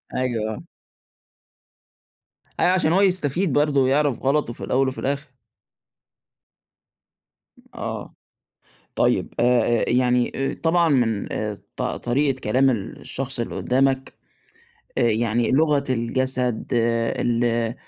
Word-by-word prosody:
أيوه 115 -4 -1
آه. - - -9 2.0
أيوه، 180 - +4
عشان 175 -3 +2
هو 190 - +4
يستفيد 180 -3 +1
برضو 145 -1 +3
ويعرف 140 0 +1
غلطه 135 -2 +1
في - - -10
الأول 135 +1 +1
وفي 130 - -3
الآخر. 140 +2 -2 2.5
آه، - - -6 0.8
طيب - - +1
آآ، - - +3 0.4
آآ - - +1
يعني 125 0 +2 0.3
طبعًا 170 +1 +3
من 120 -8 0
آآ، 105 -1 -3 0.2
ط - - -3
طريقة 135 +2 0
كلام 130 +5 +2
الشخص 125 +4 -3
اللي 115 - -4
قدامك 135 +1 0 0.9
آآ، - - +3
يعني 115 0 +1
لغة 145 0 +2
الجسد 125 0 -1
ال 115 0 0
130 Hz, 105 wpm, -22 LUFS, 120-140 Hz, 2.5 s, أيوه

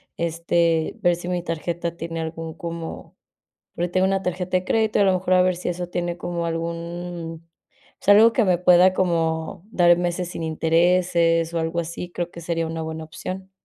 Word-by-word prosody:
este, 165 -1 0
ver 175 -1 +3
si 175 - -8
mi 180 -1 -2
tarjeta 170 +1 -3
tiene 165 -1 -4
algún 160 0 -5
como 170 -2 -7 0.6
porque 175 +1 -1
tengo 185 +1 +2
una 195 0 0
tarjeta 180 0 -1
de 180 - -1
crédito, 220 0 +1
y - - +5
a - - +4
lo 190 - +4
mejor 185 0 +1
a 180 - +5
ver 185 -1 +1
si 180 - -4
eso 175 0 -3
tiene 175 -1 -2
como 175 -1 -3
algún, 170 0 -5 0.5
pues - - -16
algo 220 +3 +8
que 230 - +2
me 180 -1 +4
pueda 180 +1 +5
como 165 -3 -1
dar 175 -4 +5
meses 175 0 -2
sin 165 - -6
intereses 165 +1 +2
o 170 - -1
algo 165 +1 -1
así, 170 +2 -6
creo 175 0 -4
que 170 - -10
sería 165 0 -2
una 160 0 -4
buena 160 0 -5
opción. 185 +4 -7
170 Hz, 195 wpm, -23 LUFS, 165-180 Hz, 0.6 s, algo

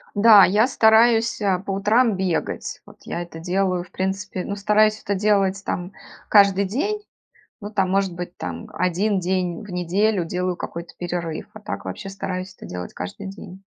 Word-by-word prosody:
Да, 205 -1 +8
я 210 +5 +4
стараюсь, 225 -1 +4
э, 195 -3 +2
по 195 - -7
утрам 210 +3 +2
бегать. 185 -4 -2
Вот - - -16
я 175 - -4
это 170 -2 -10
делаю, 180 +1 0
в 180 - -15
принципе 190 0 -3
ну, 200 - -4
стараюсь 215 +1 +3
это 200 - -1
делать 195 -1 +1
там 180 +1 -3 0.4
каждый 200 -1 +5
день, 390 - -2 0.6
ну, 205 - -7
там, 195 -3 0
может 195 -2 +1
быть, 175 0 -7
там - - -6
1 190 +3 +1
день 180 -1 -1
в 210 - -11
неделю 185 +3 +1
делаю 180 +1 -2
какой-то 170 0 -7
перерыв, 175 -2 -4
а 215 - -10
так 210 - -6
вообще 195 - -6
стараюсь 185 -1 -5
это - - -12
делать 90 0 -7
каждый 190 - -6
день. 195 -1 -10
195 Hz, 175 wpm, -22 LUFS, 180-210 Hz, 0.6 s, Да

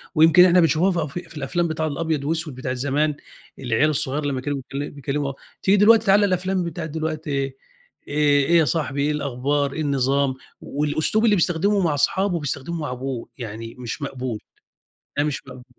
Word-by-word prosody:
ويمكن 165 +3 +7
إحنا 180 0 +5
بنشوفها 170 +3 +3
فأ 165 -3 -1
في 175 -1 -6
في 155 - -11
الأفلام 170 +5 -1
بتاع 160 0 -2
الأبيض 155 -1 -2
وأسوِد 160 -2 -2
بتاعة 130 -1 -3
زمان، 145 +3 0 0.4
العيال 125 +5 +2
الصغيّر 145 0 -2
لمّا 135 -3 -1
كانوا 145 +1 -2
بيكل 135 +2 -5
بيكلموا 140 0 -3
آه، - - -5 0.3
تيجي 200 +2 +4
دلوقتي 220 +2 +6
تعالَ 200 +1 +5
الأفلام 185 -1 0
بتاعة 170 -1 -4
دلوقتي 155 0 -4
إيه 135 -1 -2 0.5
إيه 145 -1 +3
إيه 170 +2 +4
يا 160 - +4
صاحبي 145 -3 -1
إيه 150 +2 +1
الأخبار، 140 0 -1
إيه 160 - -3
النظام، 140 -1 +1 0.3
والأسلوب 150 +10 0
اللي 210 - +5
بيستخدمه 190 +3 +2
مع 170 -6 +2
اصحابه 180 +5 +1
بيستخدمه 150 +3 -4
مع 145 -4 -3
أبوه 130 -1 -5
يعني 115 -1 -7
مش 125 +4 -5
مقبول، 130 -5 -4 0.8
ده 145 - +3
مش 150 -2 -2
مقبول. 130 -2 -11
150 Hz, 185 wpm, -23 LUFS, 135-170 Hz, 0.8 s, ويمكن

